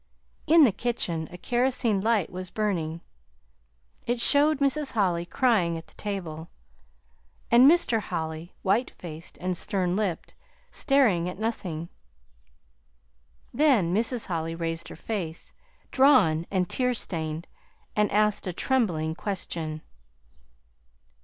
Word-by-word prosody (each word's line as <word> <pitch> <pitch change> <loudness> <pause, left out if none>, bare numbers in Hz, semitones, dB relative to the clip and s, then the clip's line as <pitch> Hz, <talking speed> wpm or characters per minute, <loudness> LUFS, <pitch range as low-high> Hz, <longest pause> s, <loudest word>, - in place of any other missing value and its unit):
In 325 0 +7
the 250 - +5
kitchen 185 -7 -2
a 180 - -9
kerosene 240 -2 +1
light 220 -4 +1
was 185 0 -6
burning. 170 -7 -2 1.1
It 240 0 0
showed 295 +4 +4
Mrs. 280 +1 0
Holly 175 -6 0
crying 185 -9 +2
at 165 - -9
the - - -23
table, 175 -6 -5 1.0
and 245 +4 +8
Mr. 320 -9 +3
Holly, 160 -3 -5
white 210 +6 +2
faced 165 -1 -10
and 185 0 -2
stern 185 -2 0
lipped, 200 -5 -2 0.4
staring 230 - +2
at 180 - -8
nothing. 185 -7 -3 1.7
Then 250 - +3
Mrs. 230 +3 0
Holly 165 -2 -3
raised 165 0 -4
her - - -9
face, 175 -7 -5 0.4
drawn 250 - +4
and 185 -2 0
tear 250 +4 0
stained, 160 -5 -4 0.5
and 210 0 +2
asked 210 -1 +1
a 180 - -3
trembling 175 - 0
question. 160 -4 -5
190 Hz, 120 wpm, -26 LUFS, 170-235 Hz, 1.7 s, and